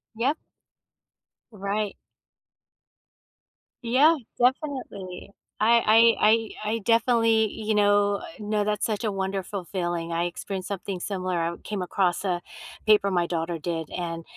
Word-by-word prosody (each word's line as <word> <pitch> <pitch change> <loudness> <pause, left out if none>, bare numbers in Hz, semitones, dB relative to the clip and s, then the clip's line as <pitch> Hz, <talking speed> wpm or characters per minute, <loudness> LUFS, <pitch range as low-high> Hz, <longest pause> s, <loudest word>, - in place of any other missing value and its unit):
Yep. 270 +7 0 1.1
Right. 205 0 -3 1.9
Yeah, 285 +8 +5 0.2
definitely. 245 -9 -2 0.3
I 230 0 +5
I 215 - +5 0.4
I - - -1
I - - -2
definitely, 230 -2 +3
you 215 -1 -2
know 205 0 +3 0.2
no, 210 0 0
that's 210 0 0
such 215 0 -2
a 215 - 0
wonderful 195 -1 -3
feeling, 175 -2 -2
I 170 +1 0
experienced 185 +2 -5
something 190 -2 -4
similar, 185 -3 -2
I 170 +1 -1
came 205 -3 -3
across 180 +1 0
a 180 -2 -1 0.5
paper 210 -2 +5
my 175 -2 +1
daughter 165 0 -2
did, 165 -1 -4
and 165 -2 -4
200 Hz, 125 wpm, -26 LUFS, 180-220 Hz, 1.9 s, Yeah